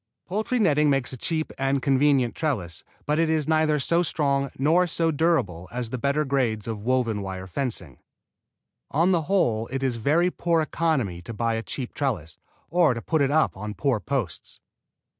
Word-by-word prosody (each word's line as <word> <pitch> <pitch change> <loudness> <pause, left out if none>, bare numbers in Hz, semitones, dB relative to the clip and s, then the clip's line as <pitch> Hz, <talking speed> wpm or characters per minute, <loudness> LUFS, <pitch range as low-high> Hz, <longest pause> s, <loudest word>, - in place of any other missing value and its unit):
Poultry 215 +6 -1
netting 150 -8 +3
makes 135 -2 0
a - - -4
cheap 155 +5 -2
and 135 +1 +1
convenient 135 -2 +2
trellis, 100 - -3 0.2
but 150 +2 +1
it 165 -1 +2
is 155 -2 +1
neither 155 -1 +3
so 170 +4 +2
strong 140 -4 0
nor 165 +6 +3
so 165 0 0
durable 140 - 0
as 120 -1 -4
the 130 - -3
better 140 +4 +1
grades 120 -6 0
of 110 -2 -4
woven 115 -3 0
wire 95 -1 -5
fencing. 95 - -4 0.9
On 165 +6 +2
the 175 -3 +3
whole 120 - +1
it 135 +1 -4
is 130 -3 0
very 160 +10 +2
poor 170 -2 +1
economy 150 - -1
to 110 +6 -8
buy 115 +1 0
a 115 - -1
cheap 125 +2 -5
trellis 90 - -3 0.3
or 165 -7 +4
to 115 - -5
put 160 -3 +1
it 135 - +3
up 155 +2 +2
on 105 +2 -6
poor 135 -6 +1
posts. 115 - -4
140 Hz, 180 wpm, -25 LUFS, 115-155 Hz, 0.9 s, or